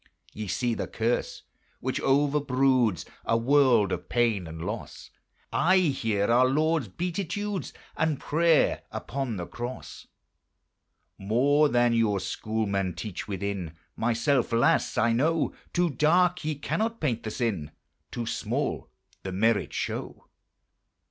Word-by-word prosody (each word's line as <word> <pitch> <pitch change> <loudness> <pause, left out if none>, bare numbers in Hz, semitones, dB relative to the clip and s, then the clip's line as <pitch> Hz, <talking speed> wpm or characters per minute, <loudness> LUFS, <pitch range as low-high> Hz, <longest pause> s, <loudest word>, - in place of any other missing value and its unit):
Ye 110 0 -5
see 115 +7 0
the - - -3
curse 115 +2 -2 0.4
which - - -2
overbroods 135 - +2 0.2
A 115 - +2
world 120 -5 +4
of 90 - -4
pain 115 -7 +1
and 80 +1 -7
loss: 105 +3 -6 0.4
I 185 +3 +4
hear 115 - +1
our 120 +3 +4
Lord's 155 0 +1
beatitudes 190 - -3 0.2
And 160 -3 0
prayer 165 0 +2
upon 135 -4 -4
the 90 - -4
cross. 120 +6 -7 1.1
More 140 +9 +3
than 120 -1 +3
your 110 -4 +2
schoolmen 100 -2 -2
teach, 105 -5 -6
within 95 -4 -4 0.2
Myself, 120 +3 +1
alas! 115 0 +2
I 115 +1 +3
know: 155 +7 +1 0.2
Too 175 -2 +1
dark 175 +6 +3
ye 155 0 -1
cannot 220 +10 -2
paint 120 -7 -1
the 110 - -4
sin, 105 - -2 0.4
Too 120 - -4
small - - -2 0.3
the 95 - -5
merit 105 +1 +1
show. - - -4
120 Hz, 125 wpm, -27 LUFS, 105-150 Hz, 1.1 s, world